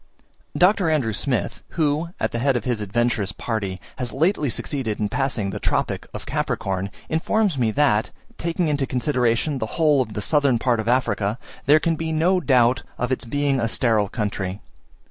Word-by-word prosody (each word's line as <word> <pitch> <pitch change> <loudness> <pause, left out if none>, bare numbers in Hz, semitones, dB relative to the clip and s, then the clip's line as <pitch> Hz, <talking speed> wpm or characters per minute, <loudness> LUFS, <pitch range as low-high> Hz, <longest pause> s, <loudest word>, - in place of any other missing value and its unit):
Dr. 185 -1 +4
Andrew 135 -8 +1
Smith, 125 +3 -2 0.2
who, 155 +1 +1
at - - 0
the 120 - -2
head 135 +1 +2
of 115 - -5
his 120 -4 -1
adventurous 105 0 0
party, 105 -5 -3 0.2
has 125 -2 -2
lately 150 - +1
succeeded 120 -3 -2
in 105 -1 0
passing 115 -6 -1
the - - -5
Tropic - - -1
of - - -7
Capricorn, 95 0 -2 0.2
informs 190 +3 +1
me 120 -4 +1
that, 110 -3 +2 0.3
taking 170 0 0
into 145 -3 0
consideration 125 +1 0
the 110 - -2
whole 150 -4 +4
of 110 -4 -4
the 105 - -3
southern 145 -3 +3
part 120 0 +1
of 110 - -3
Africa, 110 -4 +1 0.3
there 150 +2 +7
can 165 +1 +1
be 160 0 -3
no 170 +4 +3
doubt 125 -5 +3 0.2
of 125 +1 -2
its 130 - -1
being 140 +2 0
a 115 - +1
sterile 110 -3 +1
country. 100 -3 -3
125 Hz, 180 wpm, -23 LUFS, 110-150 Hz, 0.3 s, there